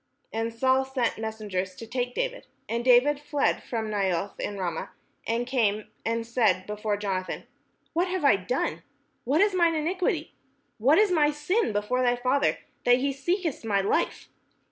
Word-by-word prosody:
And 225 +1 -1
Saul 260 +3 +2
sent 265 -4 -1
messengers 210 -4 -3
to 230 - -8
take 245 +1 -3
David: - - -3 0.2
and 235 +1 -2
David 260 +4 +5
fled 295 -1 0
from 225 -2 -3
Naioth 195 -2 -1
in 205 - -3
Ramah, 175 -4 -3 0.4
and 230 +2 0
came 215 -5 0
and 230 0 -1
said 220 -6 +2
before 210 0 -2
Jonathan: 190 -2 -3 0.5
"What 345 +3 +1
have 365 -4 -1
I 275 - +7
done? 200 +7 -2 0.4
what 280 +8 +3
is 410 -1 +4
mine 340 -2 +3
iniquity? 350 +4 -1 0.5
and 215 - -10
what 295 - +7
is 420 -2 +4
my 300 -4 +4
sin 300 - 0
before 210 +5 0
thy 245 -1 +3
father, 255 +3 +1 0.3
that 245 0 +5
he 275 +2 0
seeketh 330 +2 -1
my 205 -3 +1
life?" 195 - 0
245 Hz, 165 wpm, -27 LUFS, 210-295 Hz, 0.5 s, I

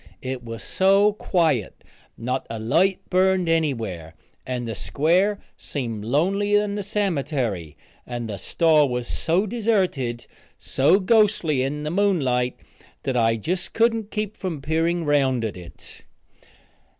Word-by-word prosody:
It 130 -1 -4
was 115 -1 -7
so 195 +2 +3
quiet; 160 - 0 0.3
not 125 +3 -3
a 115 - -4
light 170 - +1
burned 185 -1 +3
anywhere, 115 - -1 0.3
and 125 -2 -3
the 115 - -3
square 180 - +1 0.2
seemed 115 -7 -4
lonelier 195 - +2
than 205 -1 -3
the 205 - -2
cemetery, 140 - -2 0.3
and 120 -1 -4
the 105 -2 -5
store 155 - +3
was 125 -1 -2
so 170 - 0
deserted, 190 - -1 0.3
so 145 +9 +3
ghostly 200 - +3
in 145 +3 -2
the 150 - -3
moonlight, 140 -11 +1 0.5
that 130 -1 -1
I 115 -1 +3
just 175 - -4
couldn't 225 -2 +2
keep 215 -1 -3
from 175 -6 -4
peering 165 +4 0
around 135 -5 +2
at 110 - -4
it. 90 -2 -13
155 Hz, 135 wpm, -23 LUFS, 125-190 Hz, 0.5 s, so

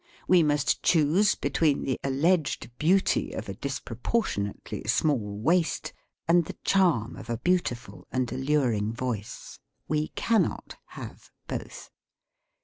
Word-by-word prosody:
We 180 -2 +6
must 145 -2 +1
choose 175 +6 +3
between 145 +1 +1
the 130 - -1
al 135 - -1
leged 160 -2 +1
beauty 185 +5 +2
of 110 - -5
a 100 - -4
disproportionately 120 - -3
small 115 -5 +1
waist 165 - +1 0.3
and 170 +1 +5
the - - -8
charm 170 - +2
of 120 - -10
a 115 - -1
beautiful 175 -7 -1
and 130 -2 -1
al - - -3
luring 125 -7 +1
voice. 115 -4 -5 0.3
We 155 0 0
cannot 230 -1 0
have - - -10 0.2
both. - - -6
145 Hz, 130 wpm, -27 LUFS, 120-170 Hz, 0.3 s, We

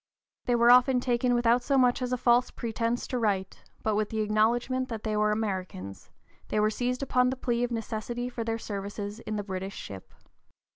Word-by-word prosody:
They 245 - +2
were 235 0 +6
often 250 +1 +6
taken 245 0 +1
without 240 0 +3
so 275 +2 +1
much 250 -1 +3
as 250 0 -2
a 250 - +1
false 245 0 +3
pretence 230 0 -2
to 250 - -2
right; 195 -4 0 0.3
but 220 - +1
with 210 0 0
the 220 -1 -1
acknowledgment 235 +5 +1
that 225 -3 -5
they 215 -1 -1
were 210 0 +2
Americans, 185 - -4 0.4
they 215 - 0
were 215 0 +3
seized 250 +3 -2
upon 250 -1 +2
the 260 - -2
plea 240 -2 0
of 245 - 0
a 235 - -2
necessity 230 +2 -4
for 240 -2 -4
their 225 0 -2
services 205 0 -5
in 215 -2 -5
the 205 - -2
British 190 0 -5
ship. 95 -2 -9
230 Hz, 205 wpm, -28 LUFS, 210-245 Hz, 0.4 s, were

